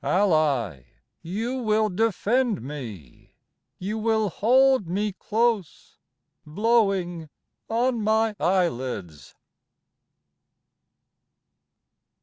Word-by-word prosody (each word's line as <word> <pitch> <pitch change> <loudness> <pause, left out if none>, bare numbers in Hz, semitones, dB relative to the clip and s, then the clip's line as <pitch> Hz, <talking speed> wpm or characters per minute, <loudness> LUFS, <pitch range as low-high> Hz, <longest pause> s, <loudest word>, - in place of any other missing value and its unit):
Ally, 155 - +1 0.4
you 230 +9 -3
will 215 -1 +2
defend 225 +3 0
me 115 - -9 0.4
You 210 +4 -4
will 220 -2 +1
hold 260 +1 +3
me 205 +4 -1
close, 215 -2 -2 0.4
Blowing 190 -3 0 0.4
on 235 +1 0
my 220 0 +1
eyelids. 125 - -2
205 Hz, 70 wpm, -25 LUFS, 160-225 Hz, 0.4 s, hold